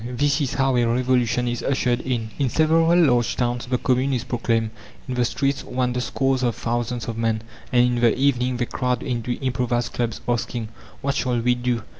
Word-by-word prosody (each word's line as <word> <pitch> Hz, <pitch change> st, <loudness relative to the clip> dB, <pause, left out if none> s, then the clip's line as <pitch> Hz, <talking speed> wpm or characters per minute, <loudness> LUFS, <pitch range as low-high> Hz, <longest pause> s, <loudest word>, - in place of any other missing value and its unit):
This 140 Hz, +5 st, 0 dB
is 135 Hz, -, -1 dB
how 135 Hz, -2 st, +2 dB
a 120 Hz, -, +3 dB
revolution 125 Hz, 0 st, +1 dB
is 120 Hz, 0 st, -2 dB
ushered 125 Hz, -3 st, +1 dB
in. 115 Hz, -4 st, -2 dB
In 135 Hz, -3 st, +2 dB
several 165 Hz, +4 st, +3 dB
large 120 Hz, -, +3 dB
towns 120 Hz, -1 st, -1 dB
the 125 Hz, 0 st, +1 dB
Commune 130 Hz, +2 st, +1 dB
is 120 Hz, -, -2 dB
proclaimed. 115 Hz, -2 st, -1 dB, 0.4 s
In 130 Hz, -, -3 dB
the 125 Hz, 0 st, +1 dB
streets 135 Hz, +4 st, -1 dB
wander 125 Hz, -1 st, -1 dB
scores 135 Hz, 0 st, 0 dB
of 120 Hz, -3 st, 0 dB
thousands 120 Hz, 0 st, -2 dB
of 115 Hz, -1 st, -4 dB
men, 115 Hz, -1 st, 0 dB, 0.3 s
and 125 Hz, -1 st, +5 dB
in 125 Hz, 0 st, +1 dB
the 120 Hz, 0 st, +4 dB
evening 125 Hz, -2 st, +1 dB
they 120 Hz, -, 0 dB
crowd 125 Hz, 0 st, -1 dB
into 120 Hz, -3 st, -2 dB
improvised 125 Hz, -2 st, -1 dB
clubs, 120 Hz, -2 st, -2 dB
asking: 120 Hz, -1 st, -2 dB, 0.3 s
"What 140 Hz, 0 st, 0 dB
shall 125 Hz, -3 st, 0 dB
we 125 Hz, +1 st, +2 dB
do?" 120 Hz, -2 st, -1 dB
125 Hz, 195 wpm, -23 LUFS, 120-130 Hz, 0.4 s, and